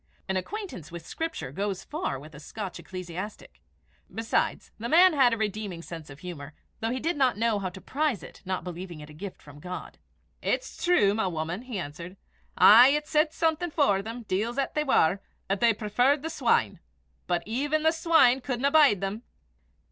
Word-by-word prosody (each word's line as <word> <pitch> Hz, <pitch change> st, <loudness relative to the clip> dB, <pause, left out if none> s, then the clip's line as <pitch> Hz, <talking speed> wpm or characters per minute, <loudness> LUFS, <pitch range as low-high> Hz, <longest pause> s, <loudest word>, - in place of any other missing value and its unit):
An 190 Hz, -, -1 dB
acquaintance 275 Hz, -, -5 dB
with 170 Hz, -1 st, -8 dB
Scripture 325 Hz, -, -4 dB
goes 195 Hz, +4 st, -3 dB
far 300 Hz, -, -3 dB
with 155 Hz, +4 st, -12 dB
a 150 Hz, -, -10 dB
Scotch 195 Hz, +5 st, -7 dB
ecclesiastic. 185 Hz, +2 st, -8 dB, 0.5 s
Besides, 225 Hz, 0 st, -1 dB
the 235 Hz, +2 st, -4 dB
man 355 Hz, +4 st, +7 dB
had 265 Hz, -5 st, +5 dB
a 230 Hz, -, 0 dB
redeeming 210 Hz, -5 st, -3 dB
sense 165 Hz, -3 st, -9 dB
of 140 Hz, +4 st, -12 dB
humour, 155 Hz, -5 st, -8 dB, 0.2 s
though 225 Hz, -, -1 dB
he 255 Hz, +2 st, -2 dB
did 330 Hz, +6 st, -1 dB
not 260 Hz, -6 st, +2 dB
know 225 Hz, -1 st, +1 dB
how 190 Hz, -2 st, -3 dB
to 180 Hz, -, -11 dB
prize 280 Hz, -, -1 dB
it, -, -, -12 dB
not 185 Hz, -2 st, -3 dB
believing 175 Hz, -1 st, -7 dB
it 150 Hz, 0 st, -11 dB
a -, -, -13 dB
gift 190 Hz, +5 st, -9 dB
of 145 Hz, 0 st, -12 dB
God. 180 Hz, +2 st, -7 dB, 0.4 s
"It's -, -, -2 dB
true, 345 Hz, -, +4 dB
my 220 Hz, -2 st, 0 dB
woman," 170 Hz, +3 st, -3 dB
he 250 Hz, -4 st, -6 dB
answered. 170 Hz, +3 st, -7 dB, 0.4 s
"Aye! 235 Hz, +4 st, +9 dB
it 295 Hz, +2 st, +1 dB
said 305 Hz, 0 st, +2 dB
something 325 Hz, +2 st, 0 dB
for 280 Hz, -11 st, +2 dB
them, 230 Hz, +3 st, -7 dB
deils 220 Hz, +5 st, -2 dB
'at 275 Hz, -, -1 dB
they 300 Hz, -, +1 dB
war, 195 Hz, -, +3 dB, 0.3 s
'at 195 Hz, 0 st, 0 dB
they 235 Hz, -1 st, +5 dB
preferred 245 Hz, +7 st, +1 dB
the 325 Hz, -, -3 dB
swine. 230 Hz, -, +1 dB, 0.5 s
But 175 Hz, -1 st, 0 dB
even 290 Hz, +7 st, -1 dB
the 320 Hz, -, +5 dB
swine 320 Hz, -6 st, +4 dB
cudna 260 Hz, +2 st, 0 dB
bide 285 Hz, -, +5 dB
them!" 195 Hz, +3 st, -3 dB
215 Hz, 190 wpm, -27 LUFS, 180-280 Hz, 0.5 s, Aye